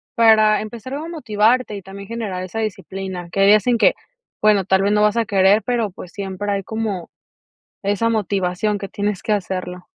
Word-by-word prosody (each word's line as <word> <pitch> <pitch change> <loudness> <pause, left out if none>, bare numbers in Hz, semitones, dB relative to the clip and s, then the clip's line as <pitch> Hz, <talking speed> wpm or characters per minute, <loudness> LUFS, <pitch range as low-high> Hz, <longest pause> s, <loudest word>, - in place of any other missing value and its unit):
para 215 -2 +5
empezar 235 +5 -7
a 310 +3 -5
motivarte 230 -6 +1
y 195 - -8
también 195 +1 -10
generar 215 -6 -4
esa 205 +5 -5
disciplina. 190 -4 -5
Que 195 - 0
hay 195 - +6
días 210 +2 +5
en 240 - +3
que, - - +5 0.5
bueno, 210 -3 +4
tal 190 0 +3
vez 200 +1 +2
no 210 - +3
vas 210 +2 +2
a 230 - +2
querer, 200 +1 +4
pero 235 -5 -1
pues 180 -1 -11
siempre 200 0 -5
hay 200 -1 -1
como 215 -5 -4 0.7
esa 205 +3 +1
motivación 200 -1 0
que 195 - -6
tienes 205 -1 -2
que 215 - -2
hacerlo. 185 -2 -3
205 Hz, 190 wpm, -20 LUFS, 195-220 Hz, 0.7 s, hay